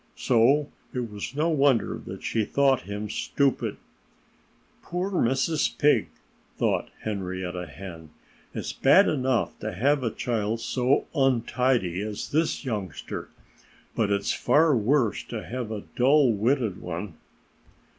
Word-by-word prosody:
So 135 +5 +3 0.2
it 120 -3 -3
was 105 +5 -6
no 155 +3 +1
wonder 140 -7 +2
that - - -7
she 110 - 0
thought 135 -1 +1
him 105 +1 -4
stupid. 135 +5 0 1.0
"Poor 180 +3 -3
Mrs. 140 0 +1
Pig!" 150 0 +3 0.5
thought - - 0
Henrietta 95 -3 -4
Hen. 80 -1 -10 0.4
"It's - - -4
bad 185 +9 +5
enough 130 - 0
to 110 -1 -4
have 140 +9 +2
a 115 - +1
child 110 -1 -2
so 125 +3 +1
untidy 125 - +1
as 105 0 -5
this 155 -1 0
youngster. 100 - -5 0.7
But 110 -3 +1
it's 100 0 0
far 155 -1 +3
worse 115 -1 +1
to 115 -3 -6
have 120 -2 -4
a 110 -2 -5
dull 135 +1 +5
witted 110 -1 0
one." 90 +1 -6
120 Hz, 125 wpm, -26 LUFS, 105-140 Hz, 1.0 s, bad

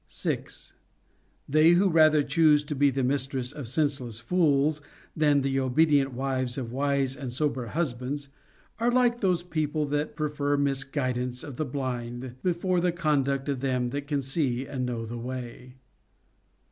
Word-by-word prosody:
6. - - -4 0.7
They 155 +3 +5
who 190 +3 +4
rather 155 -3 +5
choose 150 +1 +4
to 150 - -4
be 140 0 +3
the 135 0 -1
mistresses 130 -1 -1
of 145 -5 -7
sense 145 +2 0
less 115 -3 -6
fools 150 +1 +2 0.3
than 150 -2 +3
the 135 0 0
obedient 140 +1 +3
wives 130 -1 -1
of 120 -4 -4
wise 135 0 0
and 130 -4 -6
sober 130 -2 -1
hus 155 +1 0
bands 135 +3 -5 0.5
are 235 +1 +2
like 245 -1 +2
those 180 -4 +1
people 155 -3 -1
that 145 +1 -2
prefer 145 -2 -1
misguidance 135 -3 -1
of 140 -4 -8
the 155 - -1
blind 125 -2 -4
before 180 0 0
the 175 0 +2
conduct 140 -5 0
of 140 -3 -1
them 125 -2 0
that 140 +2 -5
can 145 -2 -1
see 135 -2 -1
and 130 -2 -3
know 115 -2 -3
the 120 +1 -6
way. 125 0 -7
140 Hz, 160 wpm, -27 LUFS, 130-155 Hz, 0.7 s, They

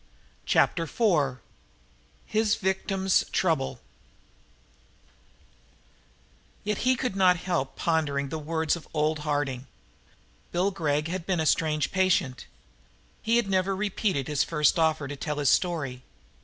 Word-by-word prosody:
Chapter 165 - +2
Four 150 - +1 0.8
His 215 0 +1
Victim's 190 -1 +1
Trouble 160 -7 0 2.8
Yet 210 -1 -1
he 255 +1 +3
could 250 -5 -2
not 185 -2 +4
help 170 -6 -2
pondering 150 -4 0
on - - -8
the 160 - -3
words 160 +1 0
of 170 - -10
old 155 0 +1
Harding. 145 -4 -2 0.8
Bill 185 +3 +1
Gregg 150 -5 -1
had 180 0 -4
been 185 -3 +1
a 160 - 0
strange 155 -1 +1
patient. 185 -9 +1 0.7
He 225 +1 +1
had 235 -4 +2
never 190 0 +1
repeated 190 - -1
his 150 -2 +1
first 150 0 +2
offer 160 -3 +1
to 145 - -5
tell 150 +1 -4
his 145 -3 +2
story. 145 -8 0
165 Hz, 130 wpm, -27 LUFS, 145-190 Hz, 2.8 s, not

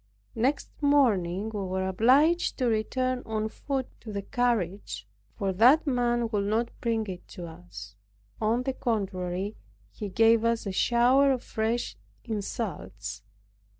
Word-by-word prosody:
Next 260 +6 0
morning 220 -9 +2
we 210 - -2
were 190 0 -2
obliged 270 - +3
to 255 - 0
return 250 +3 0
on 220 0 -2
foot 270 +3 -3 0.2
to 220 - -8
the 200 -1 -4
carriage 200 - -1 0.3
for 195 -1 -1
that 250 - +6
man 240 -3 +1
would 205 -2 0
not 225 +3 +1
bring 225 -2 0
it 185 -3 -8
to 175 - -8
us. 165 - -10 0.5
On 225 +3 +1
the 265 0 -1
contrary, 195 -4 -2 0.3
he 210 - -6
gave 225 +3 +4
us 230 -1 +1
a 195 - -2
shower 245 +7 +4
of 255 -2 -1
fresh 225 +2 -2 0.3
insults. 110 - -4
220 Hz, 140 wpm, -28 LUFS, 190-245 Hz, 0.5 s, that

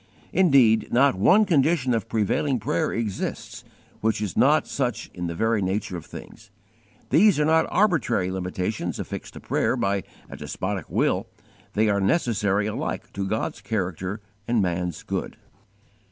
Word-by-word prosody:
Indeed 135 -11 +4
not 135 +3 +4
one 185 - +4
condition 150 -6 +2
of 110 -4 -2
prevailing 115 +5 0
prayer 95 -4 -1
exists 110 -4 -4 0.4
which 110 -1 0
is 105 -6 -3
not - - +4
such - - -3
in 90 -1 -4
the 85 - -4
very 110 +3 +1
nature 95 0 -2
of 85 - -8
things. - - -11 0.6
These 200 -1 +5
are 150 - +3
not 160 +1 +3
arbitrary 160 - +1
limitations 90 0 -3
affixed - - -6
to - - -7
prayer - - 0
by 100 0 0 0.3
a - - -9
despotic 95 -3 -4
will; - - 0 0.5
they 110 +1 +2
are 100 -1 +2
necessary 105 - +1
alike 105 - -4
to 100 0 -3
God's 110 +1 -2
character 95 -1 -3 0.3
and 120 -1 +2
man's 90 -3 -2
good. - - -4
105 Hz, 150 wpm, -24 LUFS, 95-125 Hz, 0.6 s, These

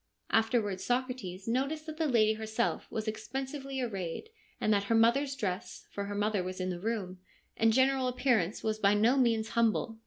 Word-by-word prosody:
Afterwards 225 -4 +1
Socrates 245 -7 -2
noticed 275 +6 -1
that 315 -1 -7
the 320 -1 +1
lady 220 -5 +4
herself 220 +2 -2
was 220 0 -4
expensively 265 +5 -4
arrayed, 195 - -4 0.3
and 215 - +2
that 200 -1 +1
her 230 - +1
mother's 270 +5 +3
dress 195 -8 -4
(for 200 - -4
her 205 0 -5
mother 205 -1 +1
was 185 +1 -5
in 185 0 -1
the 175 - -5
room) 195 -3 -3 0.4
and 225 0 +3
general 260 +2 +3
appearance 245 -7 +1
was 215 -1 -1
by 200 0 +4
no 225 +5 +4
means 230 -4 +2
humble. 225 -1 +1
225 Hz, 180 wpm, -31 LUFS, 205-255 Hz, 0.4 s, lady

